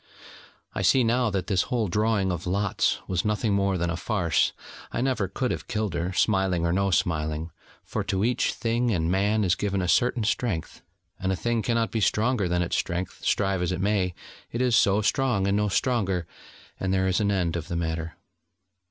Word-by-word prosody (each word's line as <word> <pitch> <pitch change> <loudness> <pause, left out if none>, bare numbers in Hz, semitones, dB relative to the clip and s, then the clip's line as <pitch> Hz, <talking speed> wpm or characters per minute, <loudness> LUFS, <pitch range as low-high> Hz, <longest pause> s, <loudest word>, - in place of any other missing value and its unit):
I - - -2
see 130 - +4
now 120 +1 +2
that 95 -3 -2
this 95 -4 +2
whole 120 -4 0
drawing 105 0 +1
of 90 0 -4
lots 100 +2 +1
was 90 -1 0
nothing 105 0 0
more 100 -1 +1
than 85 -1 -1
a - - -2
farce: 90 -1 +1 0.4
I - - -2
never 125 -6 0
could 125 +7 -2
have - - -4
killed 105 -5 -2
her, 85 +2 -2
smiling, 95 -3 +1
or 85 - +1
no 100 +1 +1
smiling: 80 -2 -1 0.3
for - - -3
to 95 0 0
each 125 +1 +1
thing 120 +1 0
and 85 -5 0
man 105 +3 +2
is 90 -2 +3
given 100 0 -1
a 90 - -1
certain 120 +4 +2
strength: 105 -5 -2 0.4
and 95 0 -1
a - - +1
thing 120 +4 -1
cannot 115 0 0
be 110 - -1
stronger 110 0 +1
than 90 0 +1
its 85 - -1
strength, 90 0 -3
strive 95 -2 +1
as 90 - 0
it 90 - -2
may: 95 -3 0 0.4
it 115 - -3
is 125 -2 +3
so 105 -1 +3
strong, 120 -5 +1
and 100 - +2
no 105 0 +1
stronger, 95 -6 0 0.5
and 95 - -1
there 95 0 +2
is 95 +2 +1
an 105 -1 +1
end 90 -4 0
of 85 -2 -4
the 85 - -4
matter. 80 -1 -3
100 Hz, 205 wpm, -26 LUFS, 90-110 Hz, 0.5 s, see